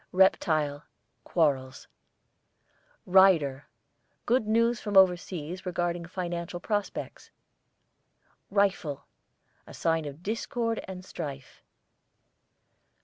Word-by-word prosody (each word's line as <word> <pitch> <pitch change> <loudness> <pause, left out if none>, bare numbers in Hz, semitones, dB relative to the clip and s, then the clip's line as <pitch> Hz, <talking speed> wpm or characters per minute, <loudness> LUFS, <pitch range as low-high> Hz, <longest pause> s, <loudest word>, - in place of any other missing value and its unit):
REPTILE, 155 -6 +2 0.4
quarrels. 135 -6 0 1.2
RIDER, 170 -8 +4 0.6
good 240 -2 +2
news 230 +1 +2
from 205 -2 0
overseas 180 -2 +2
regarding 175 -1 -2
financial 175 -1 -4
prospects. 205 +2 -4 1.2
RIFLE, 195 -8 0 0.6
a - - -11
sign 165 -1 0
of 145 +3 -8
discord 230 +2 -2
and 185 -1 -8
strife. 140 -7 -7
175 Hz, 80 wpm, -28 LUFS, 155-195 Hz, 1.2 s, RIDER